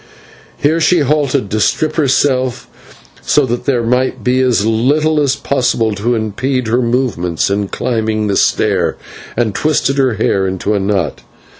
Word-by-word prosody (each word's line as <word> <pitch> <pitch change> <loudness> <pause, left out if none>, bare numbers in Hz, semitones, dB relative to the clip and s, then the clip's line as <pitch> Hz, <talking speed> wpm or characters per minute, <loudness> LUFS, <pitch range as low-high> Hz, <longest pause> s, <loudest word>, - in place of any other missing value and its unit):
Here 160 +3 +1
she 170 +1 +3
halted 140 -5 0
to 110 - 0
strip 155 +7 0
herself 130 -4 +1 0.5
so 150 - +2
that 120 -1 -3
there 125 -4 +1
might 125 +3 0
be 125 +1 +1
as 125 -5 +2
little 145 +8 +1
as 140 -2 +1
possible 120 -5 0
to 115 +4 -1
impede 120 +4 -2
her 120 +3 +2
movements 115 -9 -1
in 100 0 -1
climbing 110 -1 -2
the 100 -1 0
stair, - - +1 0.4
and 115 -4 0
twisted 140 -1 0
her 130 -4 +2
hair 100 -2 0
into 95 +3 -2
a 100 - +1
knot. 95 -5 -1
125 Hz, 155 wpm, -15 LUFS, 110-140 Hz, 0.5 s, she